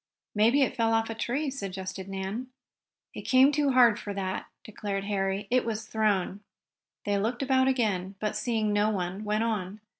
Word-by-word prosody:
"Maybe 230 +7 +4
it 260 - -1
fell 225 -2 +2
off 225 0 0
a - - -2
tree," 265 +6 -2
suggested 190 -5 -5
Nan. 195 +6 -4 0.7
"It - - -6
came 260 +2 +5
too 290 -2 +1
hard 240 -4 +6
for 205 -1 -6
that," 190 -1 -3 0.2
declared 200 -2 -4
Harry. 195 0 -1
"It 255 0 +3
was 220 -1 -3
thrown." 205 -3 0 0.7
They 205 -1 +1
looked 235 +6 -1
about 260 -1 +3
again, 205 -7 0
but, 210 -1 -2
seeing 220 -3 0
no 205 +1 +3
one, 190 0 -3
went 215 +1 0
on. 210 -3 -2
215 Hz, 175 wpm, -28 LUFS, 195-240 Hz, 0.7 s, hard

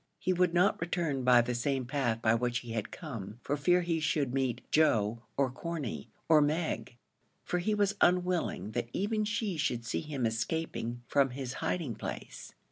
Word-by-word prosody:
He 185 - 0
would 180 -1 +3
not 180 +1 +3
return 165 -6 -1
by 125 -1 +7
the 120 +1 -2
same 130 +2 -1
path 120 -4 -1
by 110 - +5
which 120 +1 0
he 120 - -8
had 110 -2 -2
come 115 - -7
for 145 - 0
fear 175 +5 +3
he 170 -1 0
should 150 -5 0
meet 130 -3 0
Joe 115 -7 +3 0.2
or 135 -2 +2
Corney, 130 - -5 0.2
or 155 -2 +6
Meg 145 -6 -1 0.5
for 180 - -1
he 210 +4 +1
was 205 -1 +2
unwilling 180 - +2
that 115 - -2
even 215 +2 0
she 210 -4 -1
should 120 -6 -1
see - - -1
him 145 -5 -3
escaping 120 +1 -2
from 140 -1 +3
his 130 0 -5
hiding 160 -10 -1
place. - - -7
140 Hz, 180 wpm, -31 LUFS, 120-170 Hz, 0.5 s, by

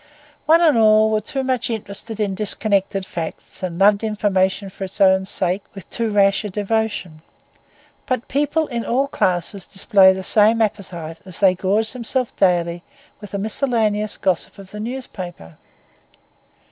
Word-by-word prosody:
One 325 +2 +6
and 310 -8 +4
all 215 0 +5
were 215 0 +1
too 270 +6 -3
much 255 -1 -1
interested 220 0 -5
in 205 -2 0
disconnected 195 -1 0
facts, 165 -3 -7
and 180 -2 -4
loved 200 +2 +4
information 200 -2 0
for 195 - -6
its 190 +3 -9
own 190 -1 +4
sake 185 0 -1
with 195 - -10
too 230 -2 -1
rash 200 -1 +3
a 210 - -4
devotion; 205 -5 -2 0.9
but 255 -2 -2
people 295 +3 0
in 235 -5 -4
all 260 +4 +1
classes 185 -5 -1
display 195 -1 +5
the 190 0 -4
same 215 +3 +4
appetite 175 -7 -3
as 185 -2 -8
they 190 -2 +4
gorge 200 +4 0
themselves 250 0 -2
daily 175 -2 +1 0.4
with 205 - -10
the 200 - -4
miscellaneous 215 -1 0
gossip 185 -3 -1
of 195 -1 -12
the 210 - -8
newspaper. 185 - -7
205 Hz, 155 wpm, -20 LUFS, 190-225 Hz, 0.9 s, One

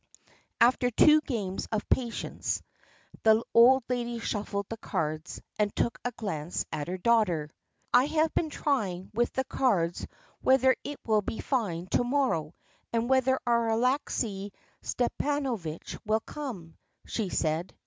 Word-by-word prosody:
After 245 +1 +4
two 300 +6 +6
games 210 -10 -3
of 215 -2 -2
patience, 240 -3 -1 0.6
the 220 +1 +5
old 250 +3 +7
lady 240 -1 -2
shuffled 205 -2 -3
the 225 - -6
cards 155 -6 -3 0.2
and 210 -1 +1
took 235 - 0
a 245 - -1
glance 175 -8 -3
at 150 - -3
her 185 +1 -3
daughter. 180 -8 +2 0.4
"I 255 - +6
have 310 +1 +1
been 320 - 0
trying 200 -13 -1
with 240 +2 +1
the 265 - 0
cards 190 -12 0 0.3
whether 260 0 +5
it 290 0 -6
will 215 -2 +3
be 215 - -5
fine 195 -10 -1
to - - +3
morrow, 245 - 0 0.4
and 230 +1 0
whether 260 0 +3
our 235 -1 +2
Alexey 225 -4 0 0.3
Stepanovitch 245 - -2
will 220 0 +1
come," 220 - -7 0.3
she 215 -5 -2
said. 160 +1 -1
230 Hz, 140 wpm, -29 LUFS, 190-260 Hz, 0.6 s, old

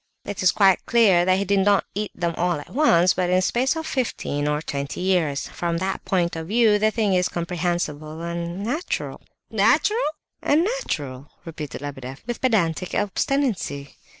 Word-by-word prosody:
"It 205 -1 -5
is 185 -1 +5
quite 195 -3 +4
clear 200 -7 +4
that 185 0 +3
he 200 - -1
did 200 +1 +2
not 200 +1 +3
eat 210 +1 -3
them 170 -1 -1
all 175 -3 0
at 145 - -11
once, 185 - +4
but 180 -1 -1
in 180 - +3
a 185 - +3
space 255 - +1
of 320 0 -4
fifteen 185 - -2
or 150 0 +1
twenty 140 -2 -4
years: 175 -7 0
from 170 -1 -2
that 190 +2 -3
point 175 -3 0
of 160 0 -5
view 215 0 +4
the 215 +1 +3
thing 215 -3 0
is 180 0 +2
comprehensible 170 -3 -3
and 170 +2 -4
natural..." 295 - -3 0.3
"Natural?" 420 +4 +3 0.4
"And 300 +3 +3
natural," 150 - -3 0.2
repeated 150 -5 -7
Lebedeff 135 -2 -7
with 240 0 -5
pedantic 185 - +1
obstinacy. 205 - -1
180 Hz, 175 wpm, -23 LUFS, 160-215 Hz, 0.4 s, is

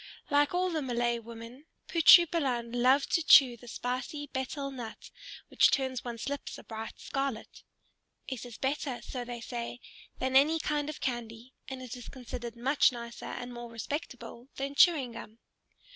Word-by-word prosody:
Like 290 0 +4
all 365 0 +1
the 315 -2 -1
Malay 240 -2 0
women, 230 +5 -11 0.2
Putri 345 0 +8
Balan 260 -9 -1
loved 255 +3 +3
to 335 - +3
chew 265 -6 +8
the 240 +1 -15
spicy 255 +5 -4
betel 275 +2 -3
nut 240 -4 -8 0.4
which - - +5
turns 260 -3 -1
one's 235 -1 -5
lips 285 0 -4
a - - -12
bright 225 0 -7
scarlet. 270 -5 -4 0.7
It 260 -3 -5
is 240 -3 -9
better, 270 -2 -2
so 250 -2 -5
they 240 -1 -7
say, 240 0 -5 0.4
than 260 0 -1
any 295 +4 +6
kind 295 -1 -1
of 305 - -7
candy, 240 0 -4
and 265 -1 -6
it 250 -1 -7
is 245 -2 -10
considered 240 -2 -7
much 265 +5 +3
nicer 235 -1 -8
and 245 0 -6
more 240 0 -8
respectable 235 0 -6
than 275 +1 -4
chewing 285 -5 +5
gum. 225 -1 -10
255 Hz, 165 wpm, -30 LUFS, 235-280 Hz, 0.7 s, Putri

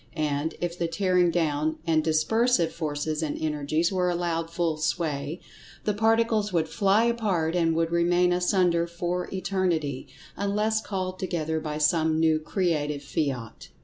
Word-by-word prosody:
And, 150 0 -1
if 175 0 -3
the 170 - 0
tearing 180 0 +2
down, 155 -2 0
and 160 -2 +2
dispersive 170 +4 +2
forces 155 -1 -2
and 155 -2 -3
energies 155 +2 0
were 180 -1 +1
allowed 170 -2 -1
full 165 -2 -1
sway, 155 0 -2 0.4
the 210 - 0
Particles 225 -1 +2
would 165 -3 +1
fly 200 +4 +2
apart 200 -9 0
and 165 -2 +2
would 165 0 0
remain 175 +1 +3
asunder 180 -2 +2
for 175 +1 -3
Eternity, 180 -8 -1 0.3
unless 210 +2 0
called 185 -3 -4
together 160 -3 -2
by 150 -1 -4
some 160 +1 +2
new 160 -1 +3
Creative 155 -4 -1
fiat. 135 -6 -3
170 Hz, 145 wpm, -26 LUFS, 155-185 Hz, 0.4 s, remain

